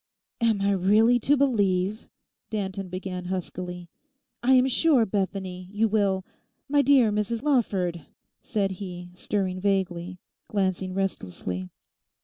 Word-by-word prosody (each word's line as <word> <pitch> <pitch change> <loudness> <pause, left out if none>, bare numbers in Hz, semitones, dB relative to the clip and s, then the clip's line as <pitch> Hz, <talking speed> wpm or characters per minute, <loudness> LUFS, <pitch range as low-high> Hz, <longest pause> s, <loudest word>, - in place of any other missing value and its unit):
'Am 225 -3 +2
I 200 0 +2
really 210 +6 +4
to 285 +5 +3
believe,' 205 -6 +1 0.4
Danton 195 -3 -3
began 185 0 -5
huskily. 180 -1 -5 0.5
'I 250 - +2
am 255 0 +5
sure, 265 -1 +3
Bethany, 190 -2 -3
you 215 +2 +2
will—My 210 +7 -1
dear 270 -6 +5
Mrs 210 +3 -1
Lawford!' 190 - 0 0.3
said 200 -4 -1
he, 180 -2 -7
stirring 185 0 -2
vaguely, 185 -2 -1 0.3
glancing 190 -2 -1
restlessly. 95 - -3
195 Hz, 115 wpm, -26 LUFS, 185-220 Hz, 0.5 s, am